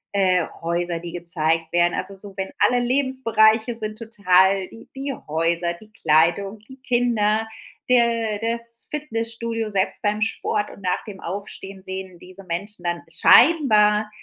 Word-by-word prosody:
äh, 185 -3 +3 0.2
Häuser, 170 0 -2
die 170 0 -8
gezeigt 165 -2 -1
werden, 175 0 +3
also 200 - -4
so, 195 0 -8
wenn 190 0 -4
alle 245 0 +4
Lebensbereiche 240 -3 +2
sind 215 -1 -5
total 195 -4 +2
die 225 - -14
die 275 +1 -4 0.2
Häuser, 170 +2 0
die 215 +5 -16
Kleidung, 195 +5 +2
die 265 - -12
Kinder, 225 -3 +1 0.4
der 230 -3 +2
das 230 +1 -4
Fitnessstudio, 230 -5 -3
selbst 195 0 -1
beim 210 +1 0
Sport 215 -1 -1
und 200 - -14
nach 180 0 -1
dem 200 -3 -9
Aufstehen 195 +1 -7
sehen 190 -2 -7
diese 185 +2 -13
Menschen 180 +2 -5
dann 175 0 -2
scheinbar 215 - +5
205 Hz, 145 wpm, -22 LUFS, 180-230 Hz, 0.4 s, scheinbar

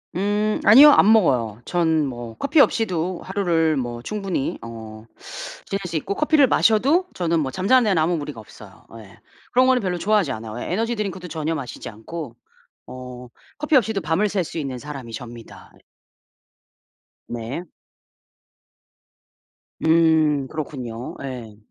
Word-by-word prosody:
음 205 +3 0
아니요 275 +8 +9
안 215 -6 +5
먹어요. 125 - +2
전 160 -3 +1
뭐 120 -3 -7
커피 295 +2 +1
없이도 185 - +1
하루를 170 -5 +1
뭐 120 -2 -4
충분히 195 -7 -3
어 110 -1 -10 0.6
지낼 195 - -3
수 165 - -6
있고 155 +5 -2
커피를 305 +1 +4
마셔도 275 - +3
저는 170 -2 0
뭐 140 -4 -1
잠자는 220 - +3
데는 185 -4 +2
아무 170 +2 +1
무리가 145 -5 -6
없어요. 110 - -15
예 110 0 -15 0.3
그런 255 +1 +4
거는 260 -1 +3
별로 180 -3 -2
좋아하지 200 -4 +1
않아요. 110 -1 -6
예 - - -5
에너지 230 +5 -1
드링크도 190 -4 -4
전혀 160 0 -2
마시지 125 -6 -7
않고 120 +4 -8 0.5
어 125 -1 -9 0.3
커피 300 +1 0
없이도 220 -5 +2
밤을 165 +6 0
샐 195 -2 0
수 165 - -6
있는 135 -4 -4
사람이 135 -3 -8
접니다. 120 0 -10 1.6
네. 120 +7 -5 2.2
음 160 -3 +3
그렇군요. 130 -6 -6
예. 120 -6 -7
160 Hz, 285 characters per minute, -22 LUFS, 125-205 Hz, 2.2 s, 아니요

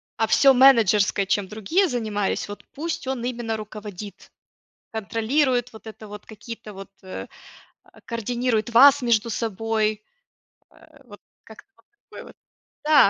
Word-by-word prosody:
а 225 - +1
всё 270 +4 +5
менеджерское, 220 -6 +4
чем 195 0 -1
другие 310 - 0
занимались 215 -5 -2
вот 205 0 -9
пусть 320 -2 -5
он 260 -3 -3
именно 235 -3 -3
руководит. 210 -2 -9 0.6
Контролирует 245 +4 0
вот 220 0 -13
это 220 0 -10
вот, 210 0 -11
какие-то 220 0 -10
вот, 195 0 -11
э, 185 -1 -7 0.6
а, - - -21
координирует 235 0 -1
вас 275 +4 +7
между 230 -2 +1
собой. 220 -1 -1 0.7
Э, 310 -2 -21
вот 205 -4 -14 0.2
как-то 220 - -15
вот - - -29 0.2
такое - - -10
вот. - - -15 0.5
Да, 300 -8 +6
225 Hz, 140 wpm, -23 LUFS, 210-250 Hz, 0.7 s, вас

